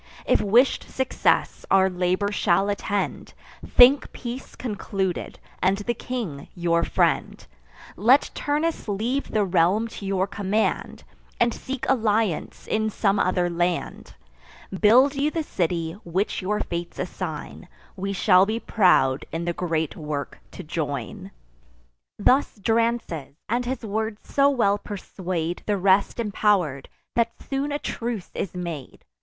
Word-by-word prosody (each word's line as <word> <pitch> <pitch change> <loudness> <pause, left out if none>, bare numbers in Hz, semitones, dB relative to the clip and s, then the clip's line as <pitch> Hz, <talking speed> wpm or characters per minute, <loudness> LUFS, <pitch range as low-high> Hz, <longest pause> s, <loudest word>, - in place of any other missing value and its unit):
If - - +3
wish'd 230 +6 +3
success 265 -1 0
our 190 0 +5
labour 185 +2 0
shall 195 -1 +2
attend, 205 0 -2 0.3
Think 260 +3 +6
peace 245 +1 -7
concluded, 195 -5 -3 0.2
and 190 +1 +3
the 210 +4 -2
king 220 - -5
your 170 -1 +1
friend: - - 0 0.5
Let 245 +9 +4
Turnus 300 +1 -1
leave 230 +7 -1
the 210 -2 +1
realm 185 +5 +2
to 205 - -8
your 190 -1 +1
command, 205 +2 -1 0.4
And 235 -1 +3
seek 270 0 -5
alliance 220 -7 0
in 220 0 0
some 200 -1 +1
other 180 -1 +2
land: 175 0 -2 0.6
Build 240 +8 +5
you 285 +1 +1
the 320 +1 -2
city 170 - -1
which 185 +6 -1
your 210 +3 -1
fates 170 0 -4
assign; 175 -1 -5 0.3
We 195 0 -3
shall 190 -1 +4
be 220 +2 -1
proud 180 - +3
in 165 +1 -3
the 175 - -1
great 160 -3 -2
work 150 -3 -5
to 185 - -8
join." 145 -7 -4 0.9
Thus 260 +7 +3
Drances; 225 - -1
and 240 +2 0
his 250 -2 -3
words 220 +1 -3
so 280 0 +5
well 205 -7 +2
persuade 180 -4 -4
The 205 -1 +1
rest 195 +1 +3
impower'd, 200 - 0 0.2
that 230 -1 +1
soon 275 +1 -1
a 290 - 0
truce 235 -8 -4
is 185 - -4
made. 170 -7 -6
200 Hz, 135 wpm, -24 LUFS, 175-230 Hz, 0.9 s, Think